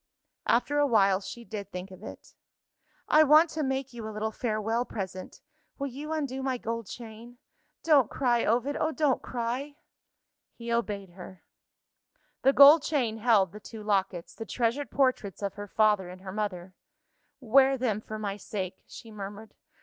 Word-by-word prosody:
After 290 +5 +2
a 290 - +4
while, 200 -5 +3
she 215 +5 -9
did 205 -3 -7
think 180 +1 -7
of 185 0 -12
it. - - -11 0.7
"I 310 - +6
want 310 +2 +6
to 315 - -3
make 265 -2 -2
you 230 -2 -7
a - - -5
little 215 +1 -3
farewell 225 0 -1
present. 190 -5 -7 0.4
Will 280 - -3
you 280 +4 -6
undo 280 -4 -2
my 265 -1 -1
gold 230 -2 -4
chain? 235 +2 -10 0.5
Don't 290 -7 +4
cry, 240 -3 +1
Ovid! 245 +6 +1
oh, 315 - 0
don't 300 -4 +1
cry!" 250 +4 -4 0.8
He 235 0 -4
obeyed 205 -5 -2
her. 185 0 -12 1.0
The 270 - +5
gold 285 +3 +9
chain 250 -8 -1
held 210 -6 +3
the 210 - -10
two 215 0 -10
lockets 190 -4 -1
the 225 - -7
treasured 240 +5 -1
portraits 255 -8 0
of 200 - -2
her 205 0 -8
father 210 -3 +2
and 185 +1 -11
her 190 -1 -7
mother. 185 -3 -4 0.7
"Wear 265 +2 +4
them 225 -5 -1
for 215 0 -7
my 205 -2 -4
sake," 190 -2 -5
she 225 - -11
murmured. 205 +1 -8
225 Hz, 165 wpm, -28 LUFS, 205-265 Hz, 1.0 s, gold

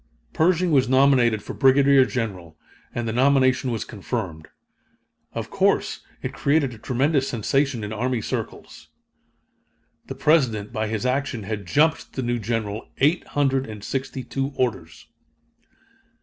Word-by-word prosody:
Pershing 175 +1 +2
was 135 -4 +3
nominated 130 -5 +4
for - - -7
Brigadier 135 0 +5
General, 95 -11 -4 0.3
and 120 -1 -3
the 110 - -2
nomination 130 0 +3
was 115 -2 -3
confirmed. 95 -7 -5 0.9
Of - - -5
course - - +1 0.2
it - - -4
created 140 -3 +1
a 115 - -12
tremendous 135 +3 +1
sensation 130 +1 0
in 105 +1 -4
army 125 +2 -1
circles. - - -6 1.2
The - - -6
President, 125 -10 +1
by 110 0 -1
his 110 +2 -3
action, 130 -3 -1
had 100 -2 -5
"jumped" 155 - +1
the 130 - -3
new 120 0 -1
General 110 -1 -3
eight 150 +6 +2
hundred 135 -2 +2
and 105 -2 -9
sixty 135 +1 -4
two 135 +2 -3
orders. 95 -10 -3
125 Hz, 135 wpm, -23 LUFS, 110-135 Hz, 1.2 s, Brigadier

